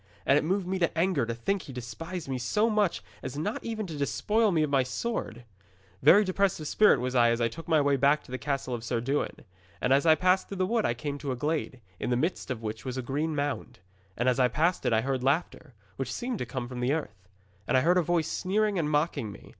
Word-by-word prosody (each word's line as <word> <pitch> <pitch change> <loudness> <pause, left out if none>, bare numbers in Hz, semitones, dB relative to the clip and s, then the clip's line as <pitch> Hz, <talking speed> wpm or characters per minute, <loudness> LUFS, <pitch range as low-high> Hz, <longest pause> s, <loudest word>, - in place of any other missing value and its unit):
And 135 - +5
it 150 - +3
moved 185 +4 0
me 190 +1 -2
to 170 -2 0
anger 165 -8 +1
to 115 - -2
think 195 +12 -1
he - - -10
despised 150 +9 -6
me 130 -1 -2
so 210 - +1
much 210 -4 +1 0.2
as 135 0 -6
not 190 +9 -3
even 220 -2 -3
to 165 -4 -7
despoil 210 +9 +1
me 160 -3 +2
of 150 - 0
my 135 -2 +4
sword. 130 - -4 0.6
'Very 190 +9 +7
depressed 190 0 +1
of 155 - -5
spirit 210 +7 +5
was 125 +1 -2
I 120 -2 +5
as 115 0 +1
I 115 - +2
took 165 +9 -9
my 160 -2 +4
way 140 -1 +2
back 140 +3 +3
to - - -15
the 130 - -4
castle 135 -3 -2
of 115 -2 -4
Sir 120 0 -1
Dewin. 135 +5 -2 0.3
And 125 - +2
as 140 +4 +3
I 160 - +7
passed 185 +2 +2
through 195 - -6
the 185 - +1
wood 225 +3 +1
I 120 - -1
came 145 +3 -4
to 140 -2 -3
a - - -1
glade, 145 -2 -2 0.2
in - - -2
the 120 - +2
midst 165 +4 -2
of 120 -3 -4
which 110 -1 -5
was 130 0 -4
a 130 - -3
green 150 +5 -2
mound. 145 -4 -3 0.4
And 120 - 0
as 125 0 +2
I 125 - +5
passed 165 +7 0
it - - +2
I 110 -1 +3
heard 130 0 -2
laughter, 140 -1 -1 0.2
which 130 -2 -3
seemed 240 - -3
to - - -3
come 130 -3 -4
from 125 0 -7
the 125 +3 +1
earth. 105 - -5 0.4
And - - +3
I - - +4
heard 175 +5 +4
a - - +3
voice 170 -1 0
sneering 205 +1 0
and 150 -2 0
mocking 150 -7 0
me. - - -13
145 Hz, 260 wpm, -28 LUFS, 125-180 Hz, 0.6 s, Very